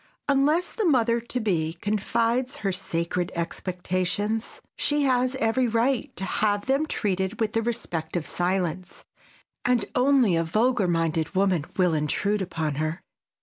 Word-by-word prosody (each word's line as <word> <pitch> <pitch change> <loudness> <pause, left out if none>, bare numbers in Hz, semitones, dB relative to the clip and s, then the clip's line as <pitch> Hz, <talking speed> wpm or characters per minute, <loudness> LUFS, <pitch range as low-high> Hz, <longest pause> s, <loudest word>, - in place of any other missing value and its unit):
Unless 295 +5 +2
the 440 - -1
mother 235 -7 +3
to 240 +2 -3
be 165 -8 0
confides 230 - 0
her 195 - +2
sacred 175 -1 -2
expectations, 185 +5 -2 0.2
she 295 0 +1
has 255 -1 +2
every 250 0 +1
right 245 +4 +1
to 190 - -4
have 205 +1 0
them 275 +4 +1
treated 190 -4 -1
with 220 -2 0
the 225 - +2
respect 225 -9 -3
of 170 -3 -1
silence, 180 0 -2 0.6
and 245 -3 +2
only 250 -7 +4
a 165 - +2
vulgar 215 +4 +2
minded 165 0 0
woman 185 -5 +2
will 180 -3 +3
intrude 195 +7 0
upon 160 -6 -2
her. 155 +3 -3
205 Hz, 145 wpm, -25 LUFS, 175-245 Hz, 0.6 s, only